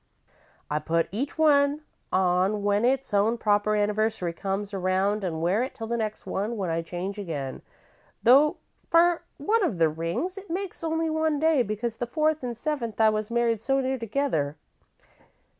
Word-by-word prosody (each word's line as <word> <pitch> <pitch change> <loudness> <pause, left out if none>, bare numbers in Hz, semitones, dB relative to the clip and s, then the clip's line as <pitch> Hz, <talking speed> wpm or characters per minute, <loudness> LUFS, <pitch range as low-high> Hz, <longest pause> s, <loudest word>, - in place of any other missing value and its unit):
"I 150 - -1
put 165 +2 0
each 260 - -3
one 290 -1 +4 0.3
on 185 +3 +2
when 205 +2 +2
its 265 -2 0
own 210 +4 +3
proper 210 -1 +2
anniversary 210 -3 0
comes 195 +3 -3
around 195 +2 0
an' 160 -3 -2
wear 185 +7 +2
it 260 +1 -3
till 225 -4 -5
the 235 +1 -2
next 215 -2 -3
one, 215 +4 -2
when 185 -4 -2
I 165 +1 0
change 180 +4 -5
again, 145 -9 -5 0.6
though 280 +5 +6 0.3
for 340 0 +4 0.2
one 445 0 +1
of 215 - 0
the 165 -1 +4
rings 170 - -3
it 395 - -15
makes 365 0 -4
only 325 0 0
one 315 -1 +1
day, 315 -3 +3
because 225 +1 -3
the 240 - -3
fourth 310 +3 +1
and 240 -3 -4
seventh 240 -6 -3
times 220 - +3
I - - +7
was 215 0 -2
married 235 -2 +1
so 270 +3 +1
near 265 0 -1
together. 225 - -1
220 Hz, 175 wpm, -26 LUFS, 195-280 Hz, 0.6 s, I